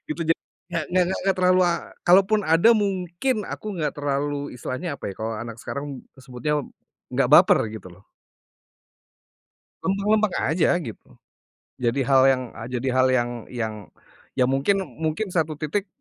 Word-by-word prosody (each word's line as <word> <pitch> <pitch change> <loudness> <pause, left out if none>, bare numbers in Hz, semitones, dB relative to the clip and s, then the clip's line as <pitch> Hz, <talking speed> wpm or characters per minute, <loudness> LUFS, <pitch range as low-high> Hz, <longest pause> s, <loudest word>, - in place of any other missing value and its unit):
Itu 160 +2 -4
ja 165 - +5 0.4
nggak 170 -2 -1
nggak 180 -1 +4 0.2
nggak 195 -1 +2
terlalu 185 0 +4
la 175 - +3 0.3
kalaupun 195 +4 +5
ada, 165 +7 +5
mungkin 195 +4 -1
aku - - -7
gak 150 -2 0
terlalu, 145 0 -2
isitilahnya 140 +5 -4
apa - - -12
ya - - -14
kalau 110 +1 -3
anak 115 0 -6
sekarang 140 +1 -5 0.4
sebutnya, 130 +4 -2 0.5
gak - - +2
baper, - - +7
gitu, 105 -4 -9
loh. 95 +4 -19 1.8
Lempeng-lempeng 210 +1 +1
aja, 160 +2 +2
gitu. 115 -10 -9 0.8
Jadi 120 +3 +1
hal 135 -1 +5
yang 130 - 0 0.3
jadi 125 +2 -2
hal 130 0 +4
yang 120 -1 +2 0.2
yang 110 -3 -2 0.7
ya 125 - +5
mungkin 145 +9 +2 0.2
mungkin 160 +6 -1
1 160 -3 0
titik 190 +6 -2
155 Hz, 145 wpm, -24 LUFS, 130-185 Hz, 1.8 s, baper